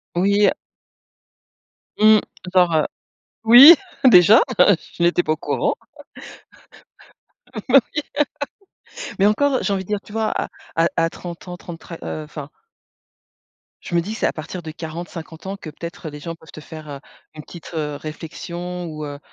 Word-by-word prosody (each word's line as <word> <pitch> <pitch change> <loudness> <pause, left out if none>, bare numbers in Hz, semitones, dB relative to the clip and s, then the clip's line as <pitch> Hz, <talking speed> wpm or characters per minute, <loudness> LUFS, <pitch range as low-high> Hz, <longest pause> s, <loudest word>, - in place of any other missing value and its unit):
Oui, 200 +3 +3
heu - - +4 1.5
mmh, 215 0 +7 0.3
genre, 180 -3 +4
heu, 155 - +3 0.6
oui, 250 +9 +10 0.3
déjà? 210 - +8 0.2
Je 175 -2 +2
n'étais 175 +1 +3
pas 155 - -1
au - - -3
courant. - - -1 1.9
Bah 270 +1 +7
oui. - - -2 1.2
Mais 195 - +4
encore, 275 +7 +2
heu, - - +1
j'ai 200 - -1
envie 190 -1 -2
de - - -21
dire, 210 -1 -1
tu - - -15
vois? 220 0 -1
À - - -2 0.3
à 165 +1 +3
à 165 0 +2
30 175 0 -9
ans, 180 - -6
30 175 -2 -10
très, 165 - -10
heu, 155 - -5
enfin 150 -1 -9 1.3
je - - -9
me 170 - +3
dis 205 +6 -5
que - - -7
c'est - - 0
à - - -2
partir 165 +3 -7
de 160 - -6
40-50 165 +1 -8
ans 195 - -4
que 160 - -9
peut-être 170 +1 -8
les 150 0 -10
gens 165 +3 -6
peuvent 160 -1 -17
te - - -11
faire, 155 -1 -11
heu, 140 - -7 0.4
une 155 - -9
petite, 170 -1 -12
heu, 150 -2 -3
réflexion 170 +3 -7
ou 155 -2 -6
heu, 145 0 -7
170 Hz, 175 wpm, -21 LUFS, 155-200 Hz, 1.9 s, oui